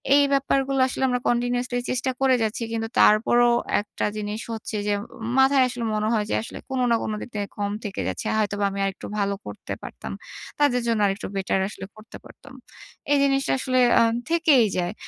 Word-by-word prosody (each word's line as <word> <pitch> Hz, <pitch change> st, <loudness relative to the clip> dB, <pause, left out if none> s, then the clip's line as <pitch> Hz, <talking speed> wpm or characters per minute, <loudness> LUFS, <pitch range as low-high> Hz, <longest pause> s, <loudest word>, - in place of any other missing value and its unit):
এই 285 Hz, -, +6 dB
ব্যাপারগুলো 275 Hz, 0 st, +1 dB
আসলে 265 Hz, -, -3 dB
আমরা 250 Hz, 0 st, 0 dB
কন্টিনিউয়াসলি 245 Hz, +1 st, 0 dB
চেষ্টা 260 Hz, +1 st, -1 dB
করে 265 Hz, -1 st, +4 dB
যাচ্ছি 220 Hz, +2 st, -2 dB
কিন্তু 225 Hz, 0 st, -2 dB
তারপরও 240 Hz, +3 st, +5 dB, 0.3 s
একটা 205 Hz, -, -4 dB
জিনিস 210 Hz, +1 st, -4 dB
হচ্ছে 220 Hz, -1 st, -6 dB
যে, 205 Hz, -, +2 dB, 0.5 s
মাথায় 265 Hz, 0 st, +5 dB
আসলে 245 Hz, -1 st, -5 dB
মনে 215 Hz, 0 st, 0 dB
হয় 215 Hz, -2 st, +1 dB
যে -, -, 0 dB
আসলে -, -, -8 dB
কোন 265 Hz, -1 st, -2 dB
না, -, -, +5 dB
কোন -, -, -3 dB
দিক -, -, -7 dB
থেকে 205 Hz, -1 st, -2 dB
কম 205 Hz, 0 st, -1 dB
থেকে 200 Hz, -, -4 dB
যাচ্ছে। 95 Hz, -1 st, -4 dB
হয়তোবা 205 Hz, -1 st, 0 dB
আমি 200 Hz, 0 st, -5 dB
আরেকটু 195 Hz, -1 st, -5 dB
ভালো 200 Hz, 0 st, +1 dB
করতে -, -, -7 dB
পারতাম। -, -, -7 dB, 0.5 s
তাদের 265 Hz, -4 st, +3 dB
জন্য 225 Hz, -2 st, +1 dB
আরেকটু 195 Hz, +1 st, -2 dB
বেটার 195 Hz, 0 st, 0 dB
আসলে 200 Hz, -, -8 dB
করতে 215 Hz, +1 st, -12 dB
পারতাম। -, -, -15 dB, 0.6 s
এই 290 Hz, -, +5 dB
জিনিসটা 275 Hz, -1 st, +1 dB
আসলে 255 Hz, -1 st, +1 dB, 0.2 s
আ -, -, +5 dB, 0.3 s
থেকেই 320 Hz, -8 st, +4 dB
যায় 175 Hz, +1 st, -1 dB
235 Hz, 185 wpm, -24 LUFS, 210-260 Hz, 0.6 s, এই